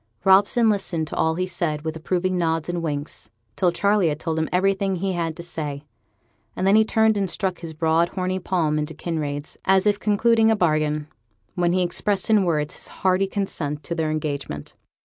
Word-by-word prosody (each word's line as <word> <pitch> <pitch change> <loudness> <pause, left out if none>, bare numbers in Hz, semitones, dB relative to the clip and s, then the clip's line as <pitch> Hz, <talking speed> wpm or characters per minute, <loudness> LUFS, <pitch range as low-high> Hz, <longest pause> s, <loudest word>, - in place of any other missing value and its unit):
Robson 200 +5 +5
listened 195 -6 0
to - - -6
all 160 0 +1
he 185 +2 -1
said 165 -4 -2
with 160 -1 -3
approving 185 +3 -1
nods 165 -2 0
and 175 -1 -2
winks, 145 -7 -4 0.3
till 180 -2 +2
Charley 200 0 +2
had 150 0 -3
told 160 -1 -2
him 160 - -1
everything 195 +1 +1
he 190 +2 -2
had 165 -2 -2
to 170 - -6
say; 150 -4 -5 0.7
and 185 - -2
then 195 +2 +5
he 220 - +6
turned 220 0 +2
and 195 -2 0
struck 185 -2 -2
his 165 -2 -7
broad 160 +2 +2
horny 185 0 -2
palm 160 -5 0
into 150 +1 -4
Kinraid's 150 -3 -4
as 190 0 +3
if 205 -1 +2
concluding 225 +2 +3
a 220 - +4
bargain, 155 -4 0 0.5
while 175 -1 +1
he 180 +1 +2
expressed 195 +4 0
in 210 -3 +4
words 150 -3 0
his - - -6
hearty 190 +1 +1
consent 155 -8 -3
to 170 - -4
their 160 -2 -1
engagement. 145 - -4
175 Hz, 195 wpm, -23 LUFS, 155-195 Hz, 0.7 s, he